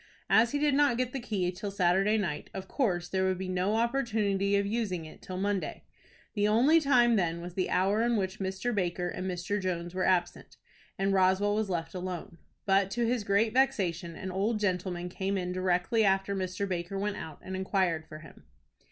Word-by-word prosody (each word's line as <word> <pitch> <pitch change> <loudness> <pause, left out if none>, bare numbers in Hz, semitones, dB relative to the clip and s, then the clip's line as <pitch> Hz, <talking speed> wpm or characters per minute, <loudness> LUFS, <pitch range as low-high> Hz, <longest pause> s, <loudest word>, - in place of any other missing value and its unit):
As 230 +2 +5
he 290 - 0
did 295 0 +2
not 280 -4 +3
get 250 0 -1
the 270 - -2
key 200 -7 -1
till 190 +3 -5
Saturday 195 +2 +2
night, 170 -8 -3
of 190 0 -6
course 180 -11 0
there 190 +1 0
would 185 -1 +1
be 190 0 -4
no 185 +3 0
opportunity 220 -5 +1
of 200 0 +2
using 200 -6 -2
it 155 - -13
till 185 - -6
Monday. 200 0 -2 0.5
The 205 -1 +1
only 265 +10 +5
time 240 -5 +4
then 170 -3 0
was 175 +1 -7
the 185 0 -1
hour 195 +4 +2
in 235 -1 +2
which 190 0 -2
Mr. 190 +5 -2
Baker 180 -3 -1
and 185 0 -4
Mr. 185 +3 -2
Jones 175 -2 -3
were 185 0 -1
absent, 175 -2 0 0.4
and 195 +1 +1
Roswell 190 +2 +3
was 215 -1 -1
left 170 -3 -3
alone. 180 -1 -6 0.3
But 195 0 +3
to 235 +4 0
his 235 -1 0
great 205 +3 +2
vexation, 185 -10 +1
an 190 +2 -5
old 210 +4 0
gentleman 180 -3 -1
came 190 +2 -2
in 180 -1 -2
directly 185 +4 +1
after 195 0 +2
Mr. 185 +1 -2
Baker 180 +1 -3
went 205 +1 -2
out, 155 -2 -7
and 190 - -5
inquired 185 -4 0
for 155 - -9
him. - - -15
195 Hz, 200 wpm, -29 LUFS, 180-215 Hz, 0.5 s, As